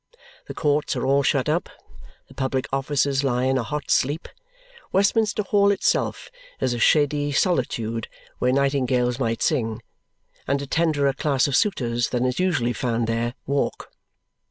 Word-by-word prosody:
The - - -7
courts 150 +1 0
are 125 - -2
all 140 +1 +3
shut 135 -1 +1
up; 160 +3 0 0.6
the - - -16
public 130 -1 -2
offices 135 0 0
lie 125 -2 0
in 130 0 +2
a - - 0
hot 150 +4 -4
sleep. 145 +5 +1 0.6
Westminster 210 +2 +2
Hall 200 0 +3
itself 200 - 0 0.3
is 125 - 0
a 120 - -3
shady 145 +2 +2
solitude 115 - 0 0.3
where 125 - +2
nightingales 130 -2 +1
might 115 -3 -1
sing, 115 -8 -1 0.6
and 140 +1 +1
a 140 - -5
tenderer 145 -2 +1
class 135 -1 +1
of 140 - 0
suitors 120 - +1
than 125 0 0
is 125 +4 -1
usually 160 -11 +1
found 120 -2 -1
there, 115 +2 -2
walk. 140 +1 -2
135 Hz, 155 wpm, -23 LUFS, 125-150 Hz, 0.6 s, all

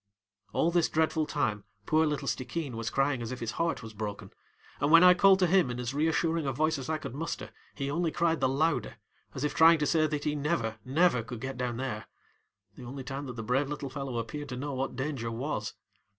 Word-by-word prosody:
All 170 - +2
this 170 -1 +2
dreadful 160 -1 +1
time 105 -9 -1 0.2
poor 155 0 +3
little 145 -2 -2
Stickeen 130 +1 -3
was 115 0 -3
crying 135 -2 +1
as 115 +1 -4
if 130 - -5
his 115 -1 -3
heart 165 -2 -1
was 110 -1 -9
broken, 105 -1 -6 0.5
and 145 - +1
when 165 +2 +8
I 180 0 +9
called 190 +1 +6
to 185 - +3
him 180 -5 +3
in 120 0 -4
as 125 +1 -3
reassuring 160 +1 +1
a - - +1
voice 155 +3 0
as 130 - -6
I 160 - +1
could 155 - -7
muster, 160 +4 -4 0.2
he 140 -1 -3
only 170 +2 0
cried 165 0 +1
the 130 - +3
louder, 140 - 0 0.4
as 130 - -3
if 150 - 0
trying 165 +1 +7
to 150 - 0
say 155 0 +3
that 150 -1 -3
he 150 - 0
never, 140 -7 -1
never 145 0 +3
could 115 +1 -7
get 135 +3 -5
down 125 -1 -2
thereŌĆöthe 120 -5 -3 0.8
only 130 +2 -7
time 140 +1 -5
that 125 - -6
the 115 - -5
brave 135 +5 +1
little 145 -2 -5
fellow 135 -3 -4
appeared 135 +6 -5
to 125 - -5
know 140 +2 -4
what 130 0 -3
danger 130 -3 -3
was. 115 -2 -3
140 Hz, 225 wpm, -29 LUFS, 125-160 Hz, 0.8 s, I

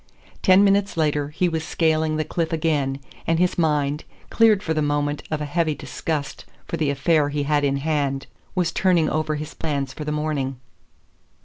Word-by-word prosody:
Ten 190 +1 +6
minutes 200 -2 +2
later 150 -2 +1
he 175 +4 0
was 160 -2 -2
scaling 160 -2 +1
the 155 - +1
cliff 165 +1 -2
again, 150 -4 0 0.3
and 165 - +2
his 180 +1 +2
mind, 150 -2 +1 0.3
cleared 220 -3 +4
for 160 - 0
the 155 - 0
moment 145 0 0
of 155 -1 -2
a - - -1
heavy 155 0 0
disgust 150 -2 -4 0.2
for - - -3
the 155 -3 0
affair 145 +1 +2
he 145 0 -1
had 145 0 +1
in 140 -1 +1
hand, 140 -2 -1 0.3
was 180 -2 +1
turning 175 -5 +2
over 155 0 0
his 150 0 -6
plans 140 -4 -3
for 150 - -6
the 150 - -3
morning. 150 -4 -2
155 Hz, 185 wpm, -23 LUFS, 145-165 Hz, 0.3 s, Ten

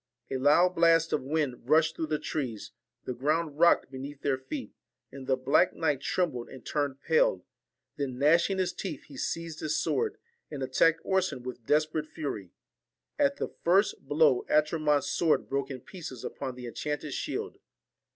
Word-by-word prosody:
A 135 - 0
loud 150 +7 +4
blast 165 -1 +4
of - - +1
wind 135 -3 -2
rushed 160 +1 +4
through 160 - -3
the 155 0 0
trees, 130 -9 -4 0.3
the 125 - -3
ground 150 +4 -1
rocked 170 0 +4
beneath 135 +2 -8
their 135 -2 +1
feet, 255 - -6 0.4
and 135 -1 -9
the 130 - +3
black 140 +7 +3
knight 150 -4 0
trembled 140 -8 -1
and 130 - -12
turned 140 -2 -2
pale; - - +2 0.5
then 135 -4 -3
gnashing 170 +7 +3
his 185 -1 0
teeth 165 -8 -5
he 145 - -14
seized 165 +4 -4
his 155 - -1
sword, 445 -1 0 0.3
and 140 -3 -5
attacked 160 +5 +3
Orson 185 -9 0
with 125 -2 -8
desperate 155 0 +1
fury. 125 - -5 0.7
At 280 -1 +3
the - - -3
first 185 -4 +2
blow, 145 -3 +4
Atramont's 150 -1 +2
sword 165 -3 +1
broke 140 0 -2
in 130 -3 -6
pieces 155 -9 -9
upon 130 -2 -5
the 125 -1 -8
enchanted 150 +4 -4
shield. - - -4
150 Hz, 165 wpm, -29 LUFS, 135-165 Hz, 0.7 s, loud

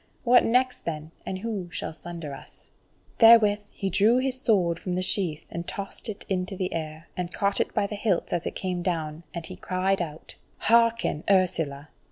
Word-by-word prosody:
What 245 0 +6
next 255 +2 +1
then, 155 -1 -4 0.2
and 190 - -2
who 200 -3 -4
shall 160 - -5
sunder 165 -3 -7
us?" - - -13 0.5
Therewith 225 -3 +7
he 195 -1 -4
drew 210 +6 +4
his 260 0 -1
sword 180 -9 +2
from 180 - -4
the 185 - 0
sheath, 175 -5 +1
and 170 0 -5
tossed 200 +3 -4
it 210 - -5
into 185 0 -2
the 185 -1 -2
air, 155 0 -5
and 180 -1 -3
caught 200 0 0
it - - -1
by - - +2
the 200 - -5
hilts 200 -3 0
as 175 -1 -1
it - - -5
came 180 -2 -2
down, 160 -3 -2
and 170 -2 -5
he - - -7
cried 185 +1 0
out: 155 -2 -6 0.2
"Hearken, 230 -7 +2
Ursula! 160 -7 +1
185 Hz, 190 wpm, -26 LUFS, 170-210 Hz, 0.5 s, Therewith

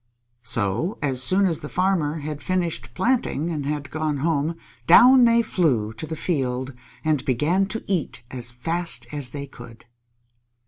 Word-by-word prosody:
So, 115 - -1
as 130 -3 +1
soon 190 +9 +5
as 170 -4 0
the 150 - -8
Farmer 170 -5 0
had 150 0 -5
finished 170 -10 -2
planting 200 - 0
and 145 -4 -3
had 145 -1 -4
gone 155 -1 -2
home, 155 +2 0 0.3
down 250 +8 +8
they 235 0 +4
flew 125 - 0
to 115 +8 -7
the 160 - -4
field, 130 -6 -2 0.3
and 150 -4 +1
began 155 +10 +1
to 225 +3 -4
eat 170 -10 -3
as 120 -2 -3
fast 125 +1 -2
as 145 -4 -3
they 140 +2 -6
could. 120 -4 -14
150 Hz, 155 wpm, -23 LUFS, 130-175 Hz, 0.3 s, down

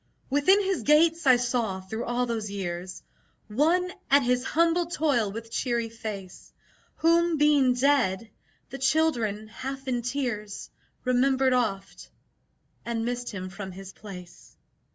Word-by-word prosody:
Within 290 +8 +4
his 385 -1 -1
gates 320 +1 +3
I 255 - +8
saw, 240 -5 -1
through 205 +5 -5
all 240 +1 0
those 225 -3 -3
years, 185 -2 -5 0.5
One 340 - +1 0.2
at 280 0 +5
his 250 0 +1
humble 335 +3 +2
toil 280 - +1
with 225 +2 -8
cheery 235 -2 -1
face, 210 -5 -8 0.4
Whom 335 0 +3
(being 290 -4 +4
dead) 245 -6 +1 0.4
the 270 - -6
children, 245 -8 +1
half 270 +4 -7
in 245 -2 0
tears, 235 -5 -4 0.3
Remembered 260 +1 +2
oft, 200 -6 -2 0.7
and 230 -1 -2
missed 245 0 -3
him 185 -3 -6
from 195 -1 -7
his 190 0 -10
place. 180 -4 -12
245 Hz, 130 wpm, -27 LUFS, 210-285 Hz, 0.7 s, I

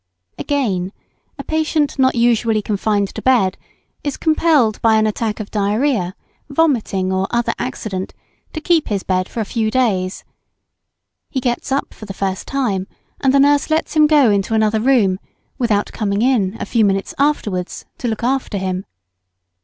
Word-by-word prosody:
] 90 - -51
Again, 200 -10 0 0.4
a 275 - -6
patient 310 -2 0
not 260 0 +3
usually 230 -2 +2
confined 205 -1 0
to - - -6
bed, 235 -8 +3 0.5
is 285 -2 -3
compelled 310 -8 +2
by 225 -1 +4
an 215 0 +3
attack 215 0 -2
of 215 - -6
diarrhoea, 210 -1 0 0.3
vomiting, 240 -11 +1
or 190 0 0
other 235 0 0
accident, 195 -6 -4 0.4
to 315 - -3
keep 330 -1 +2
his 200 -3 -2
bed 185 0 -1
for 230 - -3
a - - -2
few 220 +1 -1
days; 205 -7 0 1.1
he 265 - -2
gets 245 +1 -2
up 275 - -1
for 215 - -11
the 195 - -7
first 195 -1 -3
time, 210 -9 -1 0.3
and 270 - +2
the 275 - +4
nurse 285 +1 +3
lets 315 +1 0
him 305 -1 +6
go 290 -7 +5
into 200 +2 0
another 220 0 +2
room, 215 -6 +3 0.4
without 215 -5 +1
coming 205 -1 -1
in, 225 -6 +1
a - - -3
few 230 -2 +1
minutes 195 -1 0
afterwards, 210 -11 -1
to 245 - -2
look 225 0 -3
after 255 -4 0
him. 185 0 -3
220 Hz, 170 wpm, -18 LUFS, 195-270 Hz, 1.1 s, him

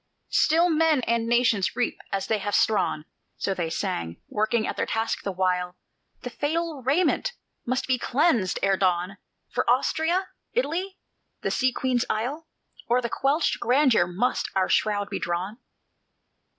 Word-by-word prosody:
"Still 330 +3 +4
men 315 -3 +3
and 230 -1 0
nations 230 -7 +2
reap 245 0 -1
as 195 -1 -1
they 220 -2 0
have 205 +1 -1
strawn," 200 -7 +1 0.3
So 195 - -1 0.2
sang 85 - -2
they, - - -25
working 215 +1 0
at - - -3
their - - -1
task 225 0 -1
the 200 - -3
while; 180 -1 -1 0.4
"The 245 - -6
fatal 315 +1 -2
raiment 330 - +1 0.3
must 255 +2 0
be 255 -1 +1
cleansed 245 - +2
ere 195 -1 +3
dawn: 185 +1 0 0.3
For - - 0
Austria? 350 +4 +1 0.2
Italy? 380 -4 -1 0.5
the - - 0
Sea 260 0 +2
Queen's 250 -1 0
isle? 265 +9 -2 0.4
O'er 245 +1 +4
what 235 -2 -3
quenched 290 +4 +1
grandeur 250 -7 +3
must 195 +9 -1
our 190 -1 +2
shroud 205 -2 +1
be - - -2
drawn? 180 +6 -3
235 Hz, 150 wpm, -25 LUFS, 195-295 Hz, 0.5 s, Still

